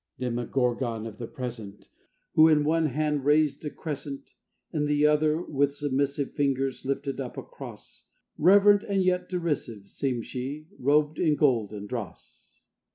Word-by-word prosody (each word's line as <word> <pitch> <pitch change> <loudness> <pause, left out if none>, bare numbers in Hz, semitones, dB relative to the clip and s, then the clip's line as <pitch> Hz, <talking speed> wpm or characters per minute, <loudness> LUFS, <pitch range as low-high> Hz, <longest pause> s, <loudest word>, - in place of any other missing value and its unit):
Demogorgon 120 -1 -1
of 110 -2 -8
the 115 - -5
Present! 115 -6 -7 0.5
Who 155 0 +7
in 155 -2 +4
one 160 +1 +2
hand 150 0 -1
raised 150 0 +2
a - - -1
Crescent, 140 -3 -6 0.4
In 150 -2 0
the 150 0 +2
other, 150 +1 +3
with 140 -2 0
submissive 140 0 -1
Fingers, 135 -2 0
lifted 140 0 -2
up 125 - -7
a - - -4
Cross; - - -12 0.3
Reverent 200 +4 +6
and 195 -2 0
yet 180 0 0
derisive 150 - -3
Seemed 125 -4 -2
she, 140 +4 -5
robed 150 +3 +2
in 155 -4 +3
gold 120 -9 +2
and 105 -1 -7
dross. 110 -6 -8
140 Hz, 150 wpm, -27 LUFS, 125-155 Hz, 0.5 s, Who